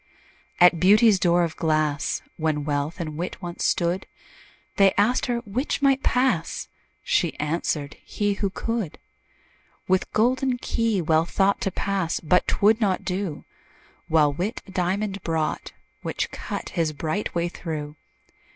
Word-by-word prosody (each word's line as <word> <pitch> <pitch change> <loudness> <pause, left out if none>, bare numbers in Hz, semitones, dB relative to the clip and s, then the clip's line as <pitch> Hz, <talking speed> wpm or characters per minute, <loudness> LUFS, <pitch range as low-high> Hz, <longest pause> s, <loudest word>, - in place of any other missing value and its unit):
At 175 -2 +6
Beauty's 205 +2 +6
door 175 -1 +3
of 165 -2 -2
glass, 155 -3 0
When 155 -2 -1
Wealth 145 +2 -2
and 155 -3 -4
Wit 175 +2 -4
once 175 -2 -5
stood, 175 +2 0 0.7
They 195 -1 +5
asked 220 +5 +2
her 240 -1 -1
'which 255 +7 -2
might 270 -1 +4
pass?" 250 -10 0 0.3
She - - +1
answered, 150 -1 -2
"he, 205 -1 -1
who 200 0 -1
could." 220 -3 -3 0.9
With 185 0 +1
golden 250 +3 +2
key 230 -6 0
Wealth 160 +1 +2
thought 195 0 +2
To 195 - -1
pass 190 -3 -1
but 175 +3 +2
'twould 215 +3 +3
not 195 -3 +1
do: 180 -4 -3 0.6
While 150 -2 +3
Wit 190 - -3
a 195 - -13
diamond 195 +2 -1
brought, 160 -2 -2 0.3
Which - - -3
cut - - -5
his 160 -2 -1
bright 160 +8 -3
way 170 0 +1
through. 155 -4 -6
180 Hz, 140 wpm, -24 LUFS, 160-205 Hz, 0.9 s, At